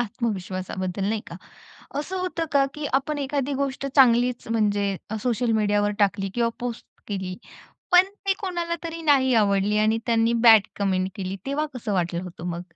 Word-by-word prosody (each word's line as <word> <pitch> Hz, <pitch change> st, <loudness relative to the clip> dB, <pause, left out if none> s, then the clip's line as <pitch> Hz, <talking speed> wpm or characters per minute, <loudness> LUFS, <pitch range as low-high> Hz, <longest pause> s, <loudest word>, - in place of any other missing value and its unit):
आत्मविश्वासाबद्दल 190 Hz, -4 st, -3 dB
नाही 215 Hz, 0 st, -1 dB
का? 170 Hz, -, -8 dB, 0.6 s
असं 370 Hz, +6 st, -4 dB
होतं 360 Hz, -2 st, -2 dB
का 280 Hz, -1 st, +4 dB
की 300 Hz, -1 st, -5 dB
आपण 275 Hz, +3 st, 0 dB
एखादी 280 Hz, 0 st, -2 dB
गोष्ट 275 Hz, 0 st, -4 dB
चांगलीच 245 Hz, -2 st, +4 dB
म्हणजे 205 Hz, -3 st, +1 dB, 0.3 s
सोशल 245 Hz, -1 st, +1 dB
मीडियावर 205 Hz, 0 st, +2 dB
टाकली 195 Hz, -1 st, +1 dB
किंवा 235 Hz, -1 st, +2 dB
पोस्ट 240 Hz, -1 st, -5 dB, 0.2 s
केली. 190 Hz, -3 st, -4 dB, 0.6 s
पण 360 Hz, +1 st, +7 dB, 0.2 s
ते 390 Hz, -, +4 dB
कोणाला 345 Hz, -5 st, -2 dB
तरी 330 Hz, 0 st, -5 dB
नाही 270 Hz, -4 st, +4 dB
आवडली 205 Hz, -1 st, +2 dB
आणि 215 Hz, +1 st, +2 dB
त्यांनी 230 Hz, -1 st, +2 dB
बॅड 220 Hz, -3 st, +8 dB
कमेंट 190 Hz, -2 st, 0 dB
केली, 190 Hz, -1 st, -4 dB
तेव्हा 290 Hz, +3 st, -1 dB
कसं 225 Hz, -4 st, -4 dB
वाटलं 175 Hz, -2 st, -1 dB
होतं 175 Hz, -2 st, -8 dB
मग? 170 Hz, 0 st, -4 dB
225 Hz, 160 wpm, -24 LUFS, 195-275 Hz, 0.6 s, बॅड